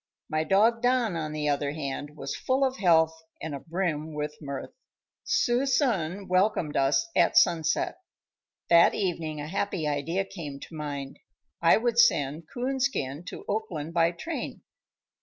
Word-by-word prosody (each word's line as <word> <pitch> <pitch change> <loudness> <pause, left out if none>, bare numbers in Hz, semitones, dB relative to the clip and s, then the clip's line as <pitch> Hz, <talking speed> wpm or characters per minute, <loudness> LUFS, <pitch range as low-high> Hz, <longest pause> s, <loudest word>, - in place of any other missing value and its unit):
My 155 0 0
dog, 220 +6 +3
Don, 245 -5 +2
on 155 -2 -3
the 150 -1 -2
other 145 0 0
hand, 145 0 -5
was 135 -1 -4
full 265 +1 +1
of 260 0 -2
health 160 -3 +3 0.2
and 160 - -5
abrim 160 0 -3
with 150 0 -3
mirth. 140 -2 -6 0.5
Suisun 245 - +1
welcomed 185 -4 +1
us 135 0 +2
at - - +4
sunset. 185 - +2 0.7
That 170 0 +6
evening 165 -5 -2
a 145 - -5
happy 180 -2 -2
idea 155 +7 -1
came 155 -8 -7
to - - -11
mind; 140 -3 -5 0.4
I 165 - +6
would 235 +1 +1
send 155 - +3
Coonskin 250 - -2
to - - -8
Oakland 175 -7 -3
by 170 -1 +4
train. 320 - -6
165 Hz, 140 wpm, -27 LUFS, 150-220 Hz, 0.7 s, That